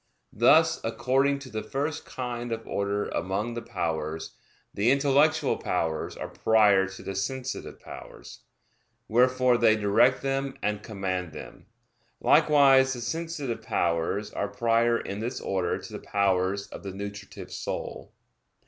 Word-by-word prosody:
Thus, 160 +9 +4
according 130 +5 +1
to 130 - -11
the 110 0 -3
first 145 +6 -3
kind 120 -2 -5
of 115 0 -4
order 100 +1 -1
among 95 +6 -2
the 120 - -4
powers, 80 -6 -4 0.4
the 105 +4 +2
intellectual 140 +3 +3
powers 80 -1 -2
are - - -5
prior 105 -3 +3
to 95 0 -10
the 95 - -4
sensitive 130 +6 -4
powers; - - -11 0.7
wherefore 125 +1 +3
they 110 -2 +5
direct 105 +5 +3
them 135 0 -1
and 105 0 -1
command 95 -5 -4
them. 75 - -11 0.5
Likewise 135 -3 +5
the 120 - -6
sensitive 160 -2 -3
powers 85 +5 -1
are 100 - -2
prior 115 +3 +2
in 100 - -5
this 120 +4 -3
order 95 -3 -1
to - - -10
the - - -5
powers 100 0 0
of - - -9
the 100 - -6
nutritive 100 0 -8
soul. - - -5
115 Hz, 140 wpm, -27 LUFS, 100-130 Hz, 0.7 s, they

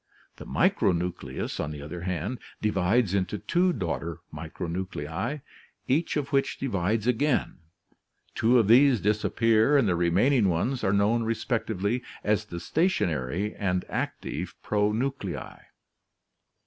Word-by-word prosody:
The - - -10
micronucleus, 85 -7 0
on 75 - -2
the 75 -1 -7
other 85 +4 -7
hand, 90 +7 -3 0.2
divides 105 +1 +1
into 100 +1 0
two 180 - +1
daughter 85 - -3 0.2
micronuclei, 85 - -4 0.5
each 155 +4 +1
of 140 -1 -3
which 135 0 +1
divides 105 -3 -1
again, 125 0 +1 0.7
two 120 +3 +3
of 115 -4 +3
these 125 +2 +6
disappear 110 +5 +3
and 130 -6 +3
the 90 - +2
remaining 95 +7 +3
ones 120 +10 -1
are 95 - +2
known 105 +4 +2
respectively 115 -1 -1 0.2
as 105 0 +1
the 85 -4 -6
stationary 95 - 0
and 90 -2 -1
active - - -4
pronuclei. 105 0 -2
105 Hz, 120 wpm, -27 LUFS, 90-125 Hz, 0.7 s, these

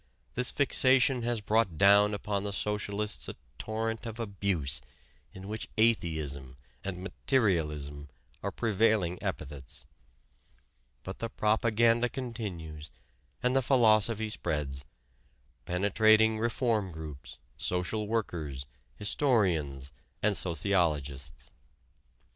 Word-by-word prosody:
This 125 0 +2
fixation 130 -2 +3
has 120 -1 -1
brought 105 -5 +1
down 100 +3 +6
upon 100 -1 -2
the 100 - -2
socialists 105 +1 -2
a - - -6 0.2
torrent 110 +1 -3
of 115 +1 -7
abuse 100 - -1 0.5
in 95 +1 -10
which 110 +1 -5
"atheism" 80 - 0 0.3
and 95 -2 -5
"materialism" 75 - 0 0.3
are - - -2
prevailing 110 -5 +1
epithets. 70 -1 -5 1.2
But 95 - -7
the 115 - -3
propaganda 115 +2 +2
continues 90 - -6 0.5
and 125 +1 +2
the 135 - +4
philosophy 110 -3 +3
spreads, 70 -8 -2 0.8
penetrating 110 +4 +4
reform 115 -4 0
groups, 75 -4 -9 0.2
social 90 +4 -1
workers, 80 -11 -3 0.3
historians, 90 - +1 0.3
and 105 -1 +3
sociologists. 75 -8 -1
100 Hz, 95 wpm, -30 LUFS, 80-110 Hz, 1.2 s, down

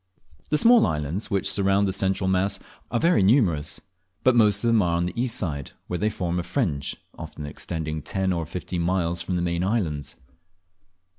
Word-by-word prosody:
The 150 - +2
small 235 +7 +6
islands 75 +7 -3
which 95 -1 0
surround 100 0 +2
the 95 - 0
central 95 0 0
mass 95 +1 +1 0.3
are 120 - 0
very 170 - +3
numerous; 95 - +2 0.4
but 130 -1 +4
most 105 -3 +4
of - - +2
them 115 -2 +4
are 85 -2 +1
on 85 - 0
the 90 - -3
east 120 0 0
side, 70 -7 -3
where 90 - -3
they 105 - +1
form 90 -3 -2
a - - 0
fringe, 85 - -2 0.2
often 75 - -7
extending 80 +1 -4
ten 95 +4 -1
or 85 -2 -3
fifteen 90 0 -4
miles 85 -1 0
from 90 +2 -3
the 85 - 0
main 85 0 -1
islands. 90 - -1
95 Hz, 190 wpm, -25 LUFS, 85-105 Hz, 0.4 s, small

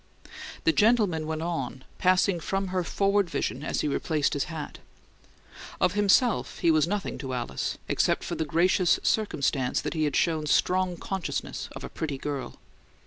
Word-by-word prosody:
The 320 - +4
gentleman 210 - +3
went 160 0 -3
on, 135 -6 -3 0.2
passing 185 0 +3
from 195 +3 -2
her 185 -1 0
forward 200 +1 +1
vision 135 -4 -2
as - - -1
he - - -1
replaced 150 +1 0
his 145 - 0
hat. 155 -2 -7 1.0
Of 180 - +2
himself 205 +4 +2
he 170 - +3
was 155 0 +3
nothing 200 -5 -3
to 130 -2 -4
Alice, 120 -1 -3
except - - +1
for - - -4
the - - -1
gracious 170 +3 +3
circumstance 140 - +1
that - - -3
he 155 -2 0
had 145 - -1
shown 155 -2 +1
strong 180 +2 +2
consciousness 190 +1 -4
of - - -8
a - - -6
pretty 145 -4 -4
girl. 140 -1 -4
165 Hz, 165 wpm, -27 LUFS, 150-190 Hz, 1.0 s, The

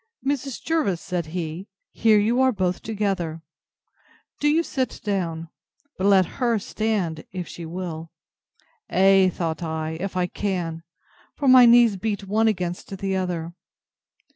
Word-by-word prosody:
Mrs. 275 -2 -2
Jervis, 305 - 0
said 175 -3 -3
he, 170 +2 -5 0.2
here 220 -2 +4
you 230 +5 +2
are 260 0 +4
both 185 -5 -1
together. 195 -7 -2 1.0
Do 295 - +1
you 315 +3 +3
sit 260 -6 -3
down; 170 -5 -2 0.5
but 190 - 0
let 195 -2 +5 0.2
her 235 -2 +3
stand, 200 -6 -2
if 180 -2 -5
she 170 -1 -8
will. 165 -2 -6 0.8
Ay, 190 0 +5
thought 165 -2 -3
I, 160 -1 -3
if 185 0 -4
I 180 - +2
can; 175 -4 -3 0.5
for 285 - -2
my 255 -1 +8
knees 235 -3 +6
beat 205 +1 -3
one 220 +3 +2
against 185 -1 -2
the 195 0 -2
other. 175 -3 -3
190 Hz, 140 wpm, -24 LUFS, 170-220 Hz, 1.0 s, my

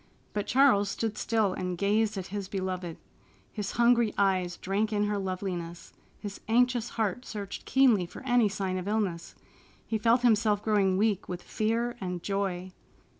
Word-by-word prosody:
But 205 -1 -2
Charles 250 -7 +4
stood 220 +1 -2
still 220 -5 +1
and 180 -1 -3
gazed 210 +2 +1
at 190 - -4
his 200 -2 -3
beloved. 185 -3 -4 0.6
His 210 -3 -4
hungry 235 -1 +3
eyes 185 -3 +1
drank 205 +3 -1
in 205 -1 +1
her 205 -1 0
loveliness, 180 -3 -5 0.3
his 205 -2 -7
anxious 245 +1 +2
heart 220 +2 -1
searched 205 -4 -7
keenly 240 -9 +4
for - - -11
any 245 -4 +3
sign 190 -2 -2
of 180 - -6
illness. 200 -6 -2 0.5
He 220 - -2
felt 230 +3 +3
himself 215 -3 +3
growing 200 -4 +2
weak 205 -1 0
with 180 -1 -5
fear 230 +2 -1
and 180 -2 -4
joy. 190 -2 -2
205 Hz, 160 wpm, -29 LUFS, 185-225 Hz, 0.6 s, Charles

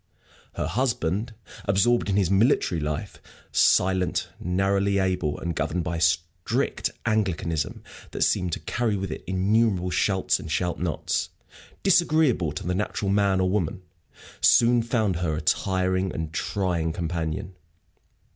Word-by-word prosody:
Her - - -2
husband, 110 - -1 0.3
absorbed 100 +4 +2
in 95 - +1
his 95 -3 +2
military 100 - +2
life, 75 +6 -4 0.3
silent, 95 0 +2
narrowly 100 +2 +1
able, 90 -6 0
and 85 -1 -3
governed 90 0 -1
by 85 +1 -3
a - - -4
strict 85 +1 0 0.2
Anglicanism 90 -8 -1 0.3
that - - -1
seemed 90 -1 +1
to - - -2
carry 115 -3 -1
with 95 -3 -4
it - - -6
innumerable 95 0 +1
"shalts" 95 0 +1
and 80 - -7
"shalt 90 +2 -1
nots," 85 -3 -2 0.5
disagreeable 155 - +3
to 75 - -6
the 90 - 0
natural 100 +1 -2
man 100 -1 +2
or 95 - +2
woman, 95 -2 -1 0.6
soon 120 0 +5
found 110 -6 0
her 85 -3 -1
a 75 - -3
tiring 95 0 0
and 80 -1 -5
trying 85 -4 -1
companion. 85 +1 -3
95 Hz, 135 wpm, -25 LUFS, 85-105 Hz, 0.6 s, soon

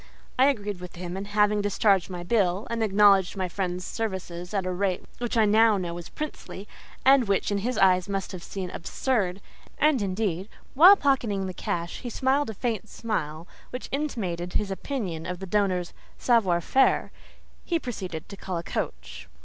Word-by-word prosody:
I 260 - +7
agreed 205 -8 -1
with 180 0 -9
him, 175 0 -6
and 195 +1 -5
having 210 0 +2
discharged 200 -2 +2
my 175 -1 -6
bill, 195 -1 +1
and 230 -1 -1
acknowledged 200 -2 +4
my 185 -1 -1
friend's 180 0 -3
services 185 -5 -4
at 195 -3 -1
a 185 - -1
rate 185 0 -1
which 240 -1 -2
I 220 - +5
now 215 0 +5
know 175 -3 -3
was 175 -1 -8
princely, 285 -9 -7 0.4
and 265 -3 +6
which 195 +1 +1
in 200 - +1
his 240 +3 -2
eyes 185 -1 +4
must 195 -1 -2
have 185 - -7
seemed 185 0 -6
absurd—and 235 - -1
indeed, 195 -1 -2 0.2
while 355 +9 +9
pocketing 245 - +1
the 185 - -4
cash, 170 0 -3
he 245 - -6
smiled 265 +3 +1
a 220 - -6
faint 220 -2 -3
smile 165 -7 -4 0.2
which 250 - -6
intimated 190 - -3
his 205 -2 -1
opinion 190 - -4
of 180 0 -3
the 190 - -7
donor's 185 -3 0 0.2
savoir 195 -8 +3
faire—he 270 - -1
proceeded 185 - -6
to 200 - -9
call 190 -2 -4
a 170 - -4
coach. 60 - -5
195 Hz, 175 wpm, -26 LUFS, 180-225 Hz, 0.4 s, while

